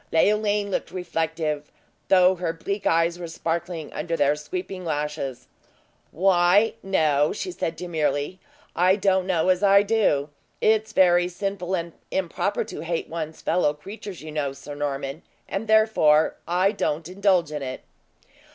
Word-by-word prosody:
Leoline 205 +3 +2
looked - - -2
reflective; 160 -4 -3 0.4
though 185 -1 +5
her 175 -2 -3
bleak 200 +5 -3
eyes 165 +1 +2
were 175 - -5
sparkling 165 0 -4
under 165 +2 -2
their 145 +1 +3
sweeping 185 +5 -6
lashes. 150 -4 -3 0.6
"Why, 185 +4 +3
no," 155 -6 +2
she 365 - -4
said, 165 - -3
demurely, 160 -1 -2 0.4
"I 185 +2 +4
don't 190 -2 +1
know 180 -1 +1
as 185 0 +3
I 200 0 +6
do. 200 -10 +1 0.3
It's 220 0 +2
very 175 -3 +4
sinful 190 0 -3
and 170 -2 -4 0.2
improper 190 +2 -1
to 220 - -8
hate 165 0 -3
one's 160 -1 -6
fellow 150 -5 +1
creatures, 195 +2 -9
you 155 - -7
know, 145 -3 -2
Sir 135 +2 -9
Norman, 140 +1 -4 0.3
and 200 +3 -4
therefore 215 -9 +4
I 185 +3 +2
don't 160 -6 -2
indulge 185 -3 +1
in 150 -1 -4
it." 130 -1 -5
175 Hz, 145 wpm, -24 LUFS, 155-195 Hz, 0.6 s, I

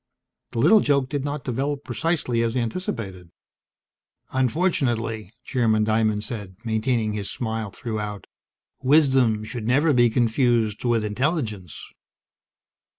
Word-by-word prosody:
The - - -5
little 165 - +6
joke 140 -6 +1
did 140 -1 -2
not 145 0 -3
develop 140 +3 -2
precisely 155 -8 -1
as 115 +2 0
anticipated. 115 - -4 1.0
"Unfortunately," 120 - 0
Chairman 110 -5 +1
Diamond 110 -1 +1
said, 105 -6 -6
maintaining 110 -1 0
his 100 -2 -3
smile 110 -3 -3
throughout, 105 -2 -5 0.6
"wisdom 130 -6 +4
should 115 0 -5
never 145 +5 +3
be 120 -2 +5
confused 115 -2 +1
with 115 -3 +1
intelligence." 110 - -2
115 Hz, 110 wpm, -24 LUFS, 110-135 Hz, 1.0 s, little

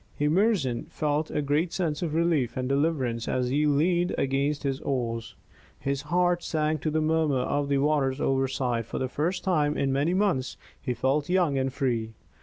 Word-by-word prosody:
Emerson 150 - +1
felt 150 +1 -1
a 150 - -1
great 150 +5 +1
sense 160 -5 -2
of 160 -3 -2
relief 160 -8 +1
and 130 0 -1
deliverance 135 -5 0
as 125 -1 0
he 150 +3 +2
leaned 170 +5 +2
against 140 +2 0
his 135 -1 -1
oars. 115 -4 -3 0.4
His 140 0 -2
heart 175 +3 +1
sang 155 -1 -1
to 155 - -1
the 155 +1 0
murmur 155 -4 +1
of 145 +2 -1
the 140 - +2
waters 140 -2 +1
overside; 130 -4 0
for - - -5
the 130 - -1
first 170 +8 -2
time 150 -6 +1
in 135 -1 +1
many 145 +6 +1
months 185 -11 0 0.2
he 125 - -2
felt 135 +5 0
young 180 -6 +2
and 135 0 0
free. 120 -5 -1
145 Hz, 180 wpm, -27 LUFS, 130-160 Hz, 0.4 s, he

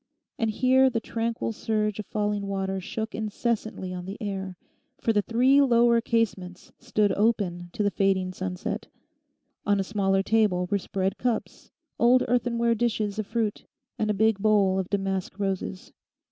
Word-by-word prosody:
And 225 - +1
here 260 +4 +4
the 235 -2 -1
tranquil 230 0 -2
surge 215 -2 -1
of 210 - -5
falling 205 -1 -1
water 195 -1 -2
shook 220 +4 -4
incessantly 220 -3 -2
on 180 -1 -6
the 195 +2 -6
air, 190 -3 -4 0.4
for 225 - 0
the 210 - +3
three 255 +6 +4
lower 235 -3 +4
casements 195 -6 -2
stood 210 -2 +1
open 195 -5 0
to 210 - -1
the 205 - +2
fading 190 -2 +1
sunset. 185 -1 -4 0.8
On 205 -1 +2
a - - +1
smaller 195 -1 +1
table 205 -5 +2
were 200 - +2
spread 190 +2 -2
cups, 240 -3 -3 0.3
old 245 +2 +5
earthenware 235 -1 +1
dishes 220 -3 -1
of 215 - -3
fruit, 220 -2 -2 0.3
and 215 - 0
a 210 - +1
big 220 0 +2
bowl 200 -2 +3
of 185 - -3
damask 195 -1 -2
roses. 195 -1 -3
210 Hz, 160 wpm, -26 LUFS, 195-230 Hz, 0.8 s, old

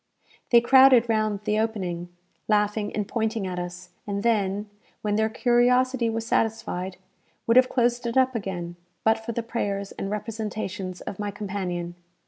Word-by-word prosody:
They 235 -1 +7
crowded 260 -1 +6
round 215 -2 0
the 210 +1 +1
opening, 185 -6 -2 0.4
laughing 210 0 +1
and 210 -2 -1
pointing 220 -2 -1
at 180 -1 -3
us; 180 0 -7 0.2
and 200 0 -2
then, 205 -3 +1 0.4
when 210 -1 0
their 220 +1 +2
curiosity 245 +1 +2
was 225 0 -3
satisfied, 190 -5 -1 0.5
would 230 - +3
have 255 0 +6
closed 240 0 +1
it 235 - -1
up 260 0 +4
again, 175 -6 -4 0.3
but 220 0 +3
for 235 - -4
the 235 - -2
prayers 200 -4 -3
and 195 - -5
representations 210 -3 -4
of 200 - -7
my 205 -1 -2
companion. 185 -4 -4
215 Hz, 155 wpm, -25 LUFS, 195-230 Hz, 0.5 s, They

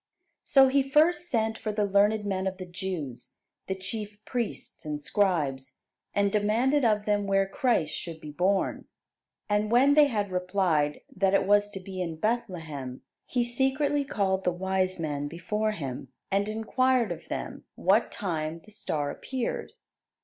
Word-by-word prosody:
So 270 -1 +6
he 275 +1 +3
first 315 +6 +3
sent 225 -4 0
for 215 - -2
the 210 0 +1
learned 205 +2 +3
men 190 -1 -1
of 190 0 -3
the 185 - -6
Jews, 175 -8 -6 0.3
the 190 - -1
chief 205 +2 -6
priests 240 -4 -4
and 150 -1 -3
scribes, 150 -7 0 0.3
and 200 -1 +2
demanded 230 +8 +2
of 210 -3 +2
them 205 -1 +1
where 195 0 +3
Christ 195 - +1
should 165 -2 -6
be 150 -1 -8
born; 185 +5 0 0.6
and 210 0 +1
when 260 +5 +5
they 295 0 +7
had 205 -6 -1
replied 180 -5 +1
that 195 +1 +3
it 195 - +3
was 205 +1 +4
to 195 - -7
be 185 0 -6
in 165 -2 -3
Bethlehem, 160 - -3 0.2
he 245 -2 +1
secretly 270 +4 +1
called 195 -7 0
the 180 - +2
wise 185 +1 0
men 145 -3 -2
before 210 +7 -2
him, 135 -8 -5 0.2
and 200 +2 +1
inquired 235 +1 +1
of 165 -1 -7
them - - -5
what 200 +6 +3
time 165 -5 -3
the 215 - -14
star 150 -8 -2
appeared. 265 - -4
200 Hz, 160 wpm, -28 LUFS, 175-225 Hz, 0.6 s, they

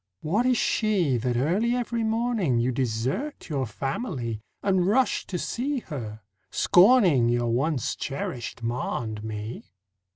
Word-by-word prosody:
What 205 +11 +1
is 250 -2 +3
she 190 - +1
That 120 +1 -1
early 195 - +1
every 235 -2 -1
morning 220 - +1
You 120 +2 +1
desert 130 - -2
your 135 -4 -1
family 125 - -3 0.2
And 190 -2 +2
rush 250 +5 +2
to 180 - -3
see 270 - -2
her, 110 - -7 0.3
scorning 180 - +5
Your 120 -1 +1
once 135 +1 0
cherished 125 -4 -5
ma 120 +1 -2
and 110 -1 -6
me? 110 +1 -6
140 Hz, 135 wpm, -26 LUFS, -, 0.3 s, scorning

